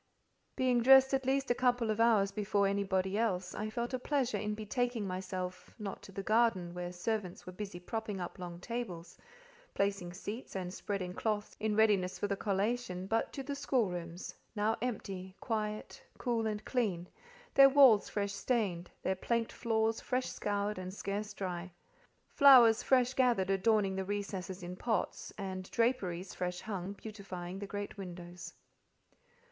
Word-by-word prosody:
Being 250 -2 +2
dressed 265 +2 +7
at 265 -1 +1
least 270 -1 +2
a - - +6
couple 245 -3 +2
of 215 - -2
hours 215 -4 +4
before 200 0 +1
anybody 195 0 0
else, 185 -5 0
I 215 +1 -3
felt 235 +3 -3
a 255 - 0
pleasure 255 -5 0
in 210 0 -2
betaking 230 +1 -1
myself—not 185 +2 -5
to - - -12
the 195 +1 -5
garden, 215 -6 +2
where 175 0 -4
servants 185 0 -3
were 185 - -7
busy 195 -2 -6
propping 215 +2 -4
up 175 +1 -6
long 175 -1 -6
tables, 190 -7 -5 0.6
placing 195 -3 0
seats, 205 +6 -7
and 180 -1 -3
spreading 190 -3 -3
cloths 210 +1 -2
in 215 0 0
readiness 205 -4 +3
for - - -1
the 200 - 0
collation 200 -1 -1
but 225 +3 0
to 275 - -4
the 285 +2 -4
schoolrooms, 180 -11 -2 0.2
now 215 +1 +2
empty, 195 -6 -4
quiet, 215 +3 -3 0.2
cool, 230 -2 0
and 215 0 -3
clean; 195 -9 -1 0.5
their 275 0 +9
walls 265 -7 +7
fresh 200 -1 -2
stained, 200 -7 -1
their 190 - +1
planked 230 +4 -1
floors 225 -1 0
fresh 255 0 -1
scoured 205 -1 -2
and 185 +1 -6
scarce 205 +1 -3
dry; 180 -1 -4 0.6
flowers 250 -5 +7
fresh 255 -1 +3
gathered 240 -8 +2
adorning 195 0 +2
the 190 - -1
recesses 195 -2 -4
in 180 +1 -5
pots, 225 +3 -2
and 185 -1 -5
draperies, 195 -7 0
fresh 180 0 -3
hung, 195 -2 -4
beautifying 195 -4 -7
the 200 - -5
great 205 +1 -5
windows. 175 -1 -8
205 Hz, 155 wpm, -33 LUFS, 185-230 Hz, 0.6 s, their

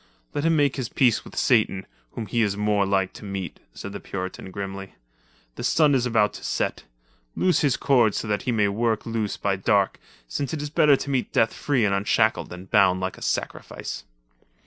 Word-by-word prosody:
"Let 145 - -1
him 165 0 +3
make 145 -3 +2
his 130 -4 -3
peace 120 -4 +2
with - - -12
Satan, 110 -6 +2 0.3
whom 115 - -4
he 115 +3 0
is 100 -2 +1
more 105 -1 +1
like 95 -1 +1
to - - -12
meet," 95 -2 -5 0.2
said 100 - -7
the 100 - -5
Puritan 95 0 -6
grimly. 95 0 -6 0.6
"The - - -5
sun 150 -3 +4
is 125 -2 +2
about 110 -3 +2
to - - -10
set. - - -2 0.5
Loose 185 -1 +2
his 140 -4 +2
cords 120 -6 +3
so - - -3
that 105 -1 0
he 125 - -1
may 105 -3 +2
work 110 +2 0
loose 115 -3 -2
by 100 -1 0
dark, 100 +1 +1 0.3
since 140 - -3
it 150 - -5
is 145 - -5
better 150 -3 +5
to 140 - -5
meet 130 -2 -1
death 115 - +2
free 130 -6 +1
and 100 - +1
unshackled 100 +1 +1
than 90 +1 -9
bound 95 -2 +4
like 95 0 -3
a - - -20
sacrifice." - - -4
105 Hz, 205 wpm, -24 LUFS, 100-130 Hz, 0.6 s, better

